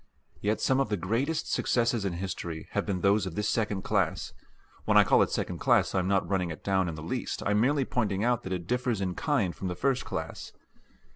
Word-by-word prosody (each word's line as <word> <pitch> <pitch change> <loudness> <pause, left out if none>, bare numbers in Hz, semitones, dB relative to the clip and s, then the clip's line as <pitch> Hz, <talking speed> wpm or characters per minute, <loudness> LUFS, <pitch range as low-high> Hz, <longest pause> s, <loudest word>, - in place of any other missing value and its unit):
Yet 105 +1 0
some 130 +3 +2
of 135 - +1
the 105 - 0
greatest 125 - -1
successes 115 -3 +1
in 95 - -1
history 85 -2 -5
have - - -1
been 95 -3 -1
those 100 0 +3
of 85 - -6
this 105 0 -1
second 105 -4 0
class - - 0 0.5
when - - +4
I - - +9
call - - +4
it - - +3
second - - -3
class - - +3
I 95 - +2
am 90 - -1
not 95 0 +1
running 95 -3 0
it 80 - -7
down 95 -2 +1
in 80 - -5
the 75 - -8
least, 80 - -3
I 100 - 0
am 105 +1 +3
merely 140 +2 +2
pointing 105 -6 -1
out 120 0 +2
that 95 - -7
it 90 -2 -4
differs 125 0 0
in 95 -2 -1
kind 115 - 0
from 95 - -4
the 90 - -3
first 130 +7 0
class. - - -6
100 Hz, 235 wpm, -28 LUFS, 90-120 Hz, 0.5 s, I